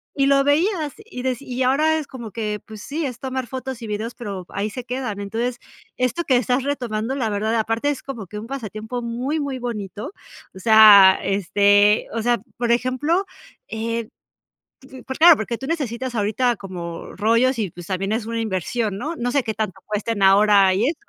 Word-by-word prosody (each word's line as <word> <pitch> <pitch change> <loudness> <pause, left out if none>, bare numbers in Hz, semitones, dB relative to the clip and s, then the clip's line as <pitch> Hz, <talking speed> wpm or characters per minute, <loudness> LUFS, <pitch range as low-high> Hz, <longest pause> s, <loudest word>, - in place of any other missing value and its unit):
y 275 - +2
lo 275 0 +4
veías 310 +1 +1
y 425 - -9
de 255 -2 -1
y 260 -2 -5
ahora 305 +5 +3
es 305 - -4
como 235 -5 -8
que, 210 -2 -3
pues 215 -1 -10
sí, 300 +2 -3
es 250 -2 -5
tomar 260 -2 -4
fotos 260 -1 -6
y 225 - -6
videos, 215 +3 -4
pero 200 -6 -6
ahí 205 +2 -3
se 250 +3 -7
quedan. 245 -5 -4
Entonces 235 +4 -3 0.4
esto 255 +7 -1
que 260 - +3
estás 250 +2 +1
retomando, 250 -4 -2
la 240 -5 -1
verdad. 215 +2 -1
Y - - +2
aparte, 225 +5 0
es 290 - -3
como 235 -8 -7
que 210 +4 -8
un 225 - -8
pasatiempo 235 -2 -5
muy, 245 +6 -2
muy 275 -3 -3
bonito. 215 - -5 0.4
O 190 - -11
sea, 205 -3 +8
este, 205 +2 +3
o 230 - -1
sea, 240 +1 +1 0.2
por 240 -1 0
ejemplo, 260 +9 0 0.5
eh, 230 0 -3 1.0
pues 265 - -5
claro, 335 -1 +8
porque 225 +2 -3
tú 270 - -7
necesitas 260 -6 -3
ahorita 225 +3 +1
como 175 -3 -7
rollos 230 +4 +2
y 200 -5 -1
pues 175 -1 -11
también 195 +1 -2
es 225 0 -2
una 230 0 -3
inversión, 210 +1 -2
¿no?, 315 +9 -4
no 245 -2 -1
sé 280 -2 +1
qué 220 - -3
tanto 215 -4 -4
cuesten 210 0 -2
ahora 195 -1 +5
y 215 +7 +1
eso. 330 - -3
230 Hz, 195 wpm, -22 LUFS, 210-260 Hz, 1.0 s, sea